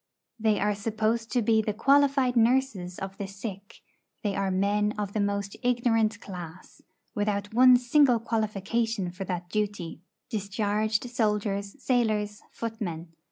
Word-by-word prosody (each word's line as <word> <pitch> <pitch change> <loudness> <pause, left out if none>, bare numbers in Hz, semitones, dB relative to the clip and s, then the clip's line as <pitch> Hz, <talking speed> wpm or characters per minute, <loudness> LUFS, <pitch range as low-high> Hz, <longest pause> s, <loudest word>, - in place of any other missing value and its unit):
They 215 -1 +2
are 210 +1 +1
supposed 220 +2 -1
to 245 -3 +2
be 220 0 +3
the 210 -1 -3
qualified 275 +1 +3
nurses 230 -7 +2
of 195 0 -6
the 200 - -3
sick; 195 0 -8 0.4
they 205 -2 -1
are 195 -1 0
men 205 +2 +1
of 205 -1 -3
the 215 - -1
most 200 -1 -1
ignorant 235 -3 +1
class, 175 -3 -10 0.3
without 205 0 -1
one 250 +1 +7
single 245 0 +4
qualification 220 -2 -1
for 190 +2 -6
that 180 -1 -4
duty 205 -6 -3 0.3
discharged 210 +1 -1
soldiers, 210 -4 -1
sailors, 215 -5 0
footmen. 195 -8 -5
210 Hz, 135 wpm, -27 LUFS, 200-230 Hz, 0.4 s, one